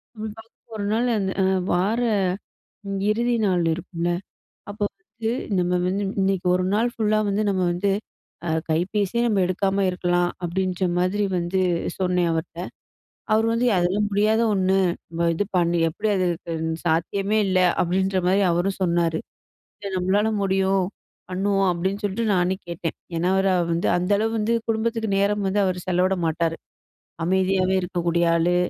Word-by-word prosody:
அப்டி 220 +1 -8 0.3
ஒரு 205 -1 -3
நாள் 240 +2 +1
அந்த 190 -2 -1 0.4
வார 200 +7 +1 1.1
இறுதி 235 +2 +1
நாள் 180 -3 +2
இருக்கும்ல, 170 0 -3 0.6
அப்போ 205 0 -4 0.2
வந்து 230 -9 -4 0.3
நம்ம 180 0 0 0.2
வந்து 200 +2 -1 0.2
இன்னைக்கு 190 -1 0
1 185 0 0
நாள் 230 +3 +2
ஃபுல்லா 215 -2 +1
வந்து 205 +2 0
நம்ம 190 -2 0
வந்து 195 +3 0 0.6
அ - - -1 0.2
கைபேசியே 200 +7 0
நம்ம 205 -4 +1
எடுக்காம 195 +1 0
இருக்கலாம். 175 -1 +1 0.2
அப்டின்ற 185 +1 -1 0.2
மாதிரி 200 +3 +1
வந்து 175 +2 -1 0.4
சொன்னேன் 180 -2 +1
அவர்ட்ட. 165 +1 -4 0.7
அவரு 220 +1 +3
வந்து 240 +2 +1
அதெல்லாம் 190 +4 +1
முடியாத 215 +3 +2
ஒண்ணு, 190 0 +2 0.6
இது 205 - 0
பண்ணி 170 -1 +2
எப்டி 210 +7 -3
அது 185 -1 +1 0.6
சாத்தியமே 195 +6 +1
இல்ல 185 -1 +2 0.2
அப்டின்ற 190 +2 +1
மாரி 195 +2 +3
அவரும் 185 +3 0
சொன்னாரு, 170 -2 +1 0.6
இது 200 -2 -5
நம்மளால 200 +4 +2
முடியும் 190 -1 +2 0.5
பண்ணுவோம். 195 +1 +1
அப்டின்னு 190 +4 -2
சொல்லிட்டு 205 +3 -1
நானே 180 +1 +1
கேட்டேன். 170 -1 -4 0.2
ஏனா 175 +2 +1
அவரு 190 0 +3 0.2
வந்து, 170 - 0
அந்த 180 +3 -2
அளவு 225 +1 0
வந்து 220 +2 +1
குடும்பத்துக்கு 225 -1 0
நேரம் 200 0 +1
வந்து 205 +2 +1
அவரு 180 -1 -1
செலவிட 185 +1 +2
மாட்டாரு. 165 +1 0 0.7
அமைதியாவே 190 +1 +2
இருக்கக்கூடிய 170 -1 0
ஆளு, 175 +2 +2
190 Hz, 140 wpm, -23 LUFS, 175-205 Hz, 1.1 s, அவரு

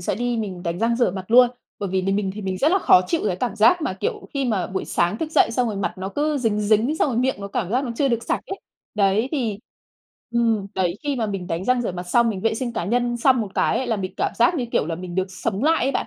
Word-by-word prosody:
sẽ 175 - -1
đi 240 +3 -1
mình 190 -5 -4
đánh 170 0 -3
răng 230 +1 +1
rửa 240 -6 +2
mặt 185 0 -6
luôn. 245 +1 +7 0.3
Bởi 200 - -3
vì 190 0 0
vì 195 +1 0
mình 200 -1 0
thì 210 - -6
mình 190 -1 -3
rất 300 - +3
là 385 - +4
khó 185 - +5
chịu 335 - 0
cái 180 - 0
cảm 220 +1 -3
giác 235 +11 +4
mà, 275 - -1
kiểu, 190 0 -4
khi 275 - 0
mà 215 -7 0
buổi 190 0 -4
sáng 175 +6 0
thức 315 - -3
dậy - - +4
xong 240 0 0
rồi 210 - -4
mặt 195 - -1
nó 190 +1 -4
cứ 295 +7 -1
dính 220 -4 0
dính, 220 +8 +2
xong - - +2
rồi 245 - -2
miệng 260 +1 +1
nó 200 0 -6
cảm 195 -2 -3
giác 255 +5 +1
nó 240 - -4
chưa 280 - +2
được 235 -2 0
sạch - - -1
ấy. 390 - -5 0.4
Đấy, 210 +4 +2
thì 230 -9 -1 0.7
ừm, 230 -4 +1
đấy 180 -2 0
khi 285 -2 -1
mà 230 -3 -1
mình 195 -3 -4
đánh 165 +3 -3
răng 250 +2 +2
rửa 220 - -2
mặt 180 0 -5
xong, 230 +7 +2
mình 195 -4 -3
vệ 225 +1 +1
sinh 240 +1 -3
cá 200 - -3
nhân 240 +3 0
xong 250 0 +3
một 210 - -3
cái 260 - +1
là 225 -3 0
mình 185 -2 -4
cảm - - -1
giác 240 +9 +3
như 255 -7 -2
kiểu - - +1
là 165 - -2
mình 175 +1 -7
được 190 +1 -1
sống 195 +3 -3
lại 320 +2 +3
ấy 275 - 0
bạn. - - -1
225 Hz, 300 wpm, -22 LUFS, 190-250 Hz, 0.7 s, luôn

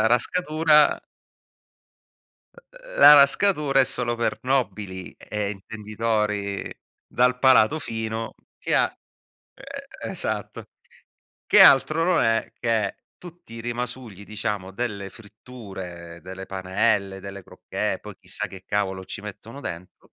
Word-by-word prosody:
La 110 - +4
rascatura 155 +4 +4 1.7
uhm, - - -12
la - - +11
rascatura 145 0 +4
è - - +7
solo 125 -2 0
per 115 0 -1
nobili 105 -8 -2
e 105 -1 -4
intenditori 105 0 -3 0.4
dal 125 0 +2
palato 130 +2 +5
fino 110 -3 -4 0.2
che - - -1
ha - - +5 0.6
uhm, 275 0 -10
esatto, - - -4 0.8
che 210 - +6
altro 155 +2 +6
non 180 -1 +3
è 115 -1 0
che 110 -4 0 0.2
tutti 175 -9 -13
i 115 - -7
rimasugli 120 -3 -5
diciamo 105 -3 -4
delle 100 -3 -4
fritture, 95 -7 -10
delle 95 +1 -8
panelle, 95 +1 0
delle 100 0 -8
crocchè, - - -4
poi - - -10
chissà 105 - -4
che 95 0 -12
cavolo 95 -2 -2
ci 100 - -7
mettono 105 +5 -9
dentro 90 -6 -9
110 Hz, 120 wpm, -24 LUFS, 100-135 Hz, 1.7 s, la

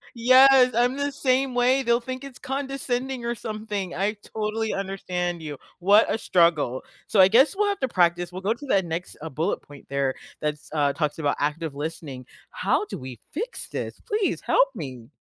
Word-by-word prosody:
Yes, 255 +1 +6
I'm 245 +3 +2
the 285 0 -1
same 265 -1 +1
way. 250 +2 +3
They'll 235 -1 +3
think 255 +2 -6
it's 275 -3 -10
condescending 265 -2 -3
or 235 0 -1
something, 215 -4 -4
I 200 +4 0
totally 220 +1 -2
understand 180 -3 -3
you. 150 -3 -6 0.2
What 200 +5 +5
a - - 0
struggle, 170 - +2 0.2
so 210 - +1
I 185 - +9
guess 255 - +5
we'll 415 +1 +2
have 400 - -2
to 265 - +1
practice, 175 -4 +1
we'll 185 +1 -7
go 205 +4 +1
to 280 +5 -11
that 195 -7 +2
next, 170 +2 -5
uh, 160 - -5
bullet 160 +7 -1
point 145 -1 -15
there 140 -1 0 0.3
that's 150 0 -3
uh, 145 -2 +2
talks 150 0 -2
about 145 -2 +1
active 150 0 -2
listening. 145 -3 -6 0.3
How - - 0
do - - -6
we 130 -3 -9
fix 455 +10 -4
this? - - -5
Please 420 -1 0
help - - +3
me. 125 -3 -7
205 Hz, 190 wpm, -25 LUFS, 160-255 Hz, 0.3 s, I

